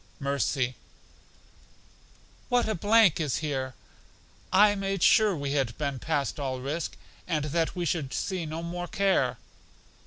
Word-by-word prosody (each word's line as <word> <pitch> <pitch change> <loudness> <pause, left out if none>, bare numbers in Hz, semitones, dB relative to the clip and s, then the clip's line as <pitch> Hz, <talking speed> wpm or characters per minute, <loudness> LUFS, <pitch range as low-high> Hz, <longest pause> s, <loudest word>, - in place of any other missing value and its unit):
Mercy: 140 -2 0 1.8
What 245 -2 +2
a 220 - 0
blank 210 -2 +4
is 150 -5 0
here! 135 -4 -3 0.8
I 205 +2 +6
made 195 -2 -2
sure 215 -3 +5
we 140 -2 -3
had 135 -5 -1
been 140 -3 -2
past 145 -1 -1
all 130 -2 -2
risk, 145 +6 -4 0.3
and 155 -4 0
that 165 +3 -1
we 175 -1 -2
should 150 -4 -1
see 185 -4 -2
no 160 +2 -5
more 175 +1 -4
care. 195 +2 +1
160 Hz, 135 wpm, -28 LUFS, 140-190 Hz, 1.8 s, I